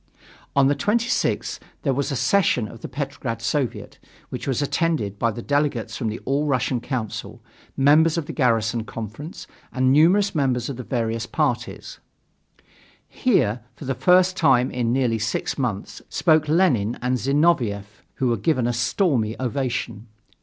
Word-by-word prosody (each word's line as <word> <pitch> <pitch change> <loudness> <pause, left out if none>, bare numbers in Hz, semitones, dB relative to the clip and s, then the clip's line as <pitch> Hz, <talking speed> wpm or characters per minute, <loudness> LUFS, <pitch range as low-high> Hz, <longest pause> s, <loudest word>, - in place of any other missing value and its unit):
On 140 -1 +5
the 140 +2 +3
26th 225 - 0 0.2
there 135 - +1
was 140 +2 -1
a - - -1
session 145 - +2
of 115 +1 -12
the - - -5
Petrograd 135 -5 -4
Soviet, 125 +3 -3 0.3
which - - -6
was 135 - 0
attended 145 - -1
by 115 - +2
delegates 140 +2 -1
from 120 - -3
the 110 - -3
All 140 +3 0
Russian 130 -2 0
Council, 120 -4 -5 0.3
members 155 +4 +4
of 165 - -2
the - - -6
Garrison 115 -4 +1
Conference, 115 - -8 0.3
and 130 0 +2
numerous 180 +7 +4
members 130 -6 0
of 130 - -7
various 115 -3 -2
parties. - - -2 1.1
Here, 125 - +1 0.2
for 150 - -10
the 135 - -1
first 185 +4 +4
time 130 -6 +3
in 120 -2 -1
nearly 120 -3 +1
six 110 +5 -2
months, 110 -7 -3
spoke 155 -1 +2
Lenin 135 - +2
and 125 +1 0
Zinoviev, 120 -7 +1
who 130 -2 0
were 115 - +1
given 150 -8 +1
a 120 - 0
stormy 115 - 0
ovation. 125 -4 -3
130 Hz, 150 wpm, -23 LUFS, 115-150 Hz, 1.1 s, On